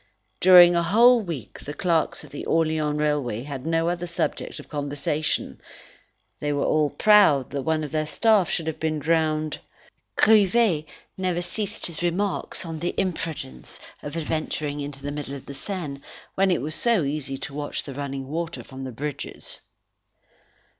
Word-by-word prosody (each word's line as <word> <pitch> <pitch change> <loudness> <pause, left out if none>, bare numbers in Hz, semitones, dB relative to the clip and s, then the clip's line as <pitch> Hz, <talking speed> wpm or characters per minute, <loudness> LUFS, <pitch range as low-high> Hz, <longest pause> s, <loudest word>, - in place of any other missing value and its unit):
During 175 -1 +8
a 170 - +3
whole 230 +8 +6
week 160 - -6
the 145 - -7
clerks 165 -1 0
at - - -16
the 145 - -6
Orleans 155 -2 +1
Railway 145 -7 0
had 140 0 -6
no 165 0 +1
other 175 0 -2
subject 170 - -2
of - - -11
conversation: 145 +1 -2 0.8
they 145 - -1
were 145 -1 0
all 155 -1 +2
proud 200 - +5
that 140 0 -2
one 155 +2 0
of 150 - -5
their 155 -1 -1
staff 210 0 +3
should 165 - -1
have 160 -1 -4
been 160 -1 0
drowned. 155 0 0 0.6
Grivet 210 -6 +4 0.3
never 180 -2 0
ceased 205 +2 -1
his 170 -2 -4
remarks 185 +1 -1
on 165 -1 -5
the 175 +2 -2
imprudence 165 - -4 0.2
of 145 +3 -6
adventuring 155 -2 -2
into 140 -1 -7
the 145 - -3
middle 145 -1 -5
of 135 - -10
the 140 - -8
Seine, 145 -2 -5 0.3
when 195 0 +2
it 180 - +1
was 155 +2 -3
so 230 -1 +2
easy 140 -1 -3
to 140 - -6
watch 145 0 -2
the 140 - -7
running 135 -1 -5
water 165 +3 -4
from 135 0 -8
the 130 - -5
bridges. 145 +4 -5
155 Hz, 165 wpm, -25 LUFS, 145-175 Hz, 0.8 s, During